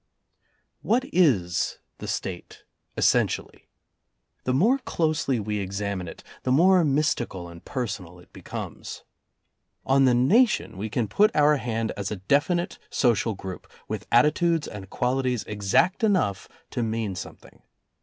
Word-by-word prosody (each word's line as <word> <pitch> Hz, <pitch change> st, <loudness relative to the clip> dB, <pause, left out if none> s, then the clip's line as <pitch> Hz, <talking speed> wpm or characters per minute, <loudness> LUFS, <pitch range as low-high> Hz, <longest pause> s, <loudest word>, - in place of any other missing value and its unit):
What 240 Hz, +4 st, +2 dB
is 105 Hz, -, +2 dB, 0.2 s
the -, -, -7 dB
State 90 Hz, -2 st, -5 dB, 0.3 s
essentially? -, -, +1 dB, 0.8 s
The 125 Hz, -, +1 dB
more 230 Hz, -, +3 dB
closely 155 Hz, -, 0 dB
we 105 Hz, 0 st, -2 dB
examine 100 Hz, -1 st, -3 dB
it, -, -, -10 dB, 0.2 s
the 130 Hz, -, -1 dB
more 180 Hz, +6 st, +5 dB
mystical 135 Hz, -, 0 dB
and 85 Hz, 0 st, -12 dB
per 130 Hz, -3 st, -3 dB
sonal 90 Hz, -5 st, -7 dB
it 90 Hz, -, -20 dB
becomes. -, -, -7 dB, 0.8 s
On 135 Hz, 0 st, +4 dB
the 125 Hz, -2 st, +4 dB
Nation 210 Hz, -, +3 dB
we 105 Hz, +4 st, -4 dB
can 115 Hz, 0 st, -1 dB
put 205 Hz, -, +4 dB
our 150 Hz, 0 st, +5 dB
hand 115 Hz, -3 st, -2 dB
as 100 Hz, -2 st, -3 dB
a 105 Hz, -, -3 dB
definite 145 Hz, -, 0 dB
social 115 Hz, -3 st, +1 dB
group, 95 Hz, -2 st, -8 dB, 0.2 s
with -, -, -5 dB
attitudes 150 Hz, +6 st, +3 dB
and 95 Hz, -2 st, -9 dB
qualities 125 Hz, -2 st, 0 dB
exact 105 Hz, -, +1 dB
enough 185 Hz, -, +1 dB, 0.2 s
to -, -, -2 dB
mean 110 Hz, -3 st, -2 dB
something. 90 Hz, -, -10 dB
120 Hz, 135 wpm, -25 LUFS, 100-155 Hz, 0.8 s, more